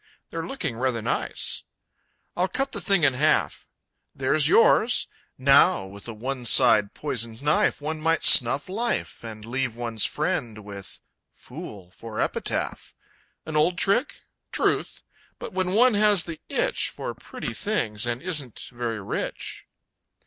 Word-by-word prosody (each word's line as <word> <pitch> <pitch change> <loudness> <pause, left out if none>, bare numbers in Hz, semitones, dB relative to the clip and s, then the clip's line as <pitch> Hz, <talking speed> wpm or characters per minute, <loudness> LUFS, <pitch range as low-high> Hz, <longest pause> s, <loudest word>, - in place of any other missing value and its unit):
They're 165 0 -4
looking 130 - -4
rather 125 -3 -1
nice! - - -1 0.7
I'll 180 +2 +1
cut 270 +7 -2
the - - -5
thing 195 -5 +2
in 140 -3 +5
half. 150 +5 0 0.5
There's 145 +3 +2
yours! 230 +5 +4 0.3
Now, 140 - +4
with 100 +3 -12
a 115 - -6
one 130 +3 -4
side 110 -4 +5
poisoned 115 -4 -3
knife 150 0 +1
One 155 +1 -3
might 165 +1 +1
snuff 135 +3 +7
life 225 - -2
And 110 -2 -9
leave 125 0 -2
one's 115 -3 -2
friend 120 - -2
with 100 -2 -10 0.3
"fool" 95 -4 -10
for 110 +3 -8
epitaph! - - -3 0.5
An 155 - -6
old 165 +4 +2
trick? 205 +11 0 0.3
Truth! - - -1 0.3
But - - -8
when 185 0 -1
one 245 +3 +5
has 205 -3 +4
the 165 -2 -8
itch - - 0
For - - -6
pretty - - -7
things 105 +2 -2
and 120 +4 -3
isn't 150 - -4
very 120 -2 -3
rich.... 95 - -5
135 Hz, 140 wpm, -25 LUFS, 115-175 Hz, 0.7 s, snuff